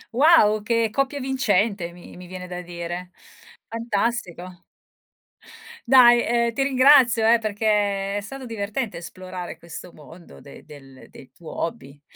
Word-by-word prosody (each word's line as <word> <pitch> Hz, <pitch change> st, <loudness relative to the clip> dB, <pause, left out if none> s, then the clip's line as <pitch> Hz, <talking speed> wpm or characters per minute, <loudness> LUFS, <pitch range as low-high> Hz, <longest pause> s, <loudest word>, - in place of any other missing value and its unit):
Wow, 255 Hz, -8 st, +5 dB
che 230 Hz, 0 st, 0 dB
coppia 275 Hz, +4 st, -1 dB
vincente 210 Hz, -8 st, 0 dB
mi 175 Hz, 0 st, -14 dB
mi 180 Hz, -, -11 dB
viene 180 Hz, 0 st, -8 dB
da 180 Hz, 0 st, -7 dB
dire. 175 Hz, 0 st, -7 dB, 0.6 s
Fantastico. 200 Hz, -6 st, -3 dB, 1.3 s
Dai, 240 Hz, -2 st, +7 dB
ehm, 235 Hz, 0 st, 0 dB
ti 270 Hz, -, 0 dB
ringrazio 260 Hz, -4 st, +5 dB
eh, 235 Hz, +1 st, +5 dB
perché 205 Hz, -2 st, -1 dB
è 205 Hz, -, -2 dB
stato 265 Hz, +5 st, -9 dB
divertente 220 Hz, +1 st, -4 dB
esplorare 180 Hz, -1 st, -8 dB
questo 170 Hz, +1 st, -10 dB
mondo 165 Hz, +4 st, -15 dB
de 140 Hz, -, -14 dB
del 135 Hz, -3 st, -15 dB
del 130 Hz, -, -15 dB
tuo 165 Hz, -, -10 dB
hobby. 145 Hz, -3 st, -6 dB
205 Hz, 135 wpm, -23 LUFS, 175-235 Hz, 1.3 s, Dai